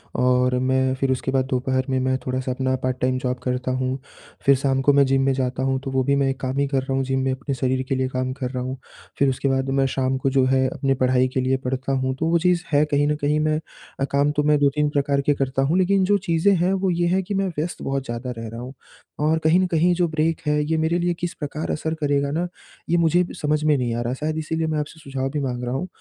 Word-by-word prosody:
और 125 0 +2
मैं 130 0 +1
फिर 135 0 0
उसके 130 0 -1
बाद 130 -1 +1
दोपहर 130 0 0
में 130 -1 +1
मैं 130 0 +1
थोड़ा-सा 130 0 -2
अपना 130 0 0
पार्ट 130 0 0
टाइम 130 0 +1
जॉब 125 0 -2
करता 125 0 -1
हूँ, 130 +1 -1 0.5
फिर 140 - +6
शाम 135 0 0
को 145 +2 +4
मैं 140 0 +5
जिम 135 0 +2
में 135 - +3
जाता 130 0 -1
हूँ 135 0 +1
तो 135 - -4
वो 130 0 +1
भी 140 +2 +2
मैं 135 -1 +2
काम 130 0 -4
ही 140 0 +2
कर 135 -1 0
रहा 135 +1 -4
हूँ 135 0 +1
जिम 135 0 -1
में 135 - +1
अपने 135 +1 -3
शरीर 130 +1 0
के 135 - +1
लिए 130 0 0
काम 130 0 -2
कर 125 -3 -2
रहा 125 -1 -3
हूँ। 130 +1 -4 0.4
फिर 140 - +3
उसके 135 +1 -1
बाद 135 0 0
मैं 135 0 +2
शाम 130 0 0
को - - +5
जो 135 0 +3
है 130 0 +2
अपनी 135 -1 0
पढ़ाई 130 0 +3
के 130 - +1
लिए 130 +1 +1
पढ़ता 130 +1 -2
हूँ, 130 0 0
तो 155 - -2
वो 170 0 +3
चीज 175 0 +2
है 145 0 +4
कहीं 145 0 +3
न 150 - +1
कहीं 150 +1 +2
मैं 155 0 +1 0.4
अ, - - 0
काम 140 +1 +2
तो 150 0 0
मैं 150 0 +4
2-3 145 +1 +2
प्रकार 140 -1 +1
के - - +6
करता 135 -1 -1
हूँ 145 +6 +2
लेकिन 190 +1 +3
जो 205 +2 +3
चीजें 170 +4 +3
हैं 180 +2 +1
वो 190 0 0
ये 175 -1 +1
हैं 185 +2 +2
कि 195 - -5
मैं 195 0 0
व्यस्त 165 +4 -3
बहुत 135 -1 -2
ज़्यादा 120 +1 -4
रह 115 0 -5
रहा 115 +2 -7
हूँ 125 +2 -8 0.5
और 155 +2 +2
कहीं 160 +3 +4
न 185 - +3
कहीं 170 +2 +4
जो 175 0 +2
ब्रेक 160 0 0
है 150 0 +2
ये 160 +1 0
मेरे 160 +2 +1
लिए 175 0 +1
किस 175 0 -3
प्रकार 150 +1 -4
असर 160 +1 -2
करेगा 140 -1 +1
ना 170 +4 -1 0.4
ये 170 - +3
मुझे 170 +2 +3 0.2
समझ 150 0 +1
में 150 -1 +3
नहीं 120 -2 -1
आ 120 - -2
रहा 120 +1 -2
शायद 155 +4 -3
इसीलिए 160 +1 -2
मैं 155 -1 -1
आपसे 150 +2 -6
सुझाव 135 -3 -3
भी 150 +2 -3
माँग 125 -2 -3
रहा 120 - -2
हूँ। 180 +7 -3
135 Hz, 275 wpm, -23 LUFS, 130-155 Hz, 0.5 s, फिर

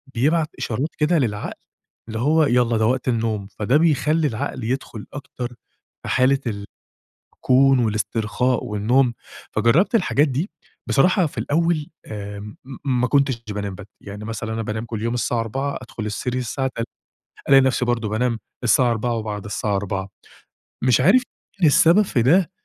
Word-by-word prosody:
بيبعت 155 +6 +2
إشارات 130 +7 -2
كده 160 +3 +2
للعقل، 105 -5 -2 0.6
اللي 110 0 -4
هو 155 +5 +3
يالّا 120 -3 +2
ده 110 - +2
وقت 130 +1 0
النوم. 110 -4 -1
فده 125 +8 +3
بيخلّي 155 0 +2
العقل 115 +1 -4
يدخُل 120 -3 -4
أكتر 125 -3 -6 0.5
في - - -5
حالة 135 +2 +3
ال 100 -3 -4 0.8
كون 135 0 +4
والاسترخاء 110 +3 0
والنوم. 120 +4 +2 0.4
فجرّبت 130 - +3
الحاجات 155 -7 +3
دي 145 - -2 0.4
بصراحة 180 +6 +3
في - - -14
الأول 160 0 0 0.2
آمم 105 0 -7 0.3
م 125 -2 +1
ما 125 - +2
كُنتش 135 -3 +1
د - - -3
بانام 100 -2 -4
بد 105 +1 -11
يعني 105 +1 -8
مثلًا 110 0 -4
أنا 115 - -2
بانام 110 +1 -4
كل 110 -2 -5
يوم 115 +1 -1
الساعة 120 0 0
04:00 135 +5 -2
أدخل 115 -3 -7
السرير 125 +4 -2
الساعة 130 +3 -2
تل 115 - -2 0.7
ألاقي 135 -1 +8
نفسي، 130 -1 +1
برضه 115 -3 0
بانام 115 +1 0 0.2
الساعة 120 +1 +4
04:00 115 +1 -1
وبعد 105 -2 -4
الساعة 105 -1 -2
04:00 100 -1 -3 0.7
مش 125 -1 +4
عارف 195 - +5 0.4
مين 160 - +6
السبب 170 +8 +5
في 135 - 0
ده، 165 +7 +4
120 Hz, 160 wpm, -22 LUFS, 110-140 Hz, 0.8 s, ألاقي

